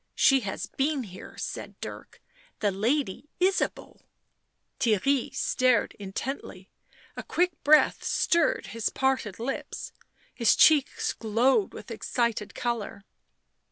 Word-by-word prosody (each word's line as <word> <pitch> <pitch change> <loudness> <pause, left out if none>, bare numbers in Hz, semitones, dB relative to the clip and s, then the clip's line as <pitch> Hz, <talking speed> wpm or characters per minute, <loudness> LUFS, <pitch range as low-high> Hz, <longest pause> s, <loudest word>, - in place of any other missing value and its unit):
" - - -50
She 270 -1 +5
has 200 -6 -4
been 275 0 -1
here," 185 -4 -11
said - - -6
Dirk. - - -9 0.2
" - - -32
The 205 - +2
Lady 240 +5 -1
Ysabeau." 375 +2 0 0.8
Theirry 240 +4 +1
stared 255 -4 +2
intently; 195 -1 -6 0.4
a - - -5
quick 360 +1 +1
breath 305 +1 +5
stirred 475 +8 +1
his 230 -1 -1
parted 265 -7 -1
lips; 245 +4 -5 0.4
his 235 -3 +3
cheeks 300 -4 +4
glowed 240 - +2
with - - -9
excited 235 -4 -2
colour. 230 -4 -3
250 Hz, 120 wpm, -27 LUFS, 210-285 Hz, 0.8 s, She